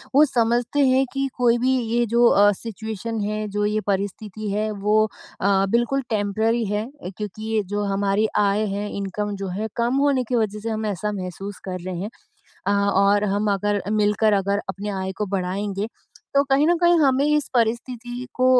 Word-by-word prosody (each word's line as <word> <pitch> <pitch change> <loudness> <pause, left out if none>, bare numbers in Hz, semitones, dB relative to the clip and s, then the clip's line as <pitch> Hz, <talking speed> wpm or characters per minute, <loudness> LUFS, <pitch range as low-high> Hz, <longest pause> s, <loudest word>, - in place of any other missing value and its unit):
वो 290 - +8
समझते 240 0 +1
हैं 260 +1 +4
कि 275 0 0
कोई 240 -1 +4
भी 260 +2 +2
ये 235 0 0
जो 235 +2 +3
अ, 205 -2 +6
सिचुएशन 220 +1 -5
है 215 +1 -2
जो 205 +1 -1
ये 210 +1 0
परिस्थिति 205 +1 -3
है 210 +2 0
वो 210 +1 +2 0.4
अ, 195 0 +3
बिल्कुल 240 +5 +1
टेम्परेरी 220 +2 0
है। 210 +1 -1 0.2
अ, - - -4
क्योंकि 215 +1 -5
ये 215 - +2
जो 205 0 0
हमारी 200 +2 +1
आय 205 +1 +2
है 205 +1 -3
इनकम 205 +1 -3
जो 195 0 -5
है 220 - -1
कम 240 +2 +1
होने 280 -2 +2
की 250 - +1
वजह 215 -2 0
से 225 +2 -4
हम 220 0 -2
ऐसा 210 0 -2
महसूस 195 +1 -6
कर 185 0 -4
रहे 185 -1 -4
हैं। 205 - -3 0.6
अ, - - +2
और 200 0 +3
हम 205 0 +1
अगर 205 0 0
मिलकर 210 0 +2
अगर 200 0 +1
अपनी 195 +2 -4
आय 190 0 -3
को 210 - -1
बढ़ाएँगे, 195 +1 -2 0.5
तो 280 - +5
कहीं 275 +3 +4
न 345 +1 +4
कहीं 345 0 +5
हमें 275 -1 +3
इस 300 -1 +2
परिस्थिति 240 +1 -1
को 255 - +2
215 Hz, 190 wpm, -23 LUFS, 200-235 Hz, 0.6 s, वो